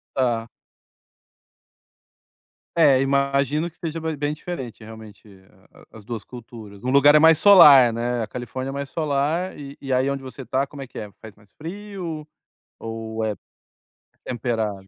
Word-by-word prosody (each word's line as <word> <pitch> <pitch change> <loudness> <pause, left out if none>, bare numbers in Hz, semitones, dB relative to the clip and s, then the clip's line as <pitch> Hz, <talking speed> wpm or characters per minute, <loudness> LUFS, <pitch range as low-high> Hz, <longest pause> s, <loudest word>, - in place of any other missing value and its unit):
Tá. 120 -3 0 2.3
É, 145 -5 +5
imagino 140 +3 +1
que 160 - -28
seja 165 -1 -5
be 160 -1 -3
bem 145 +1 -2
diferente 130 - -7
realmente, 110 -1 -13 0.7
a 110 - -12
as 105 - -15
duas 115 -2 -6
culturas. 110 -4 -12
O - - -2
lugar 140 +2 +6
é 150 - +8
mais 160 0 +6
solar, 145 - +8
né? 120 +1 -2
A 110 - -3
Califórnia 125 +3 -6
é - - -6
mais 140 0 -5
solar 155 +4 -1
e 140 -1 -9
e 135 -2 -5
aí 130 +1 +2
onde 140 -1 -4
você 130 +1 -9
tá, 135 +1 0
como 140 0 -10
é - - -7
que - - -11
é? 105 -1 -7
Faz 110 -2 -12
mais 105 -1 -25
frio 175 -3 -7 0.5
ou 115 0 -5
é 110 - 0 0.9
é - - -12
temperado? 110 -5 -3
135 Hz, 165 wpm, -23 LUFS, 115-150 Hz, 2.3 s, é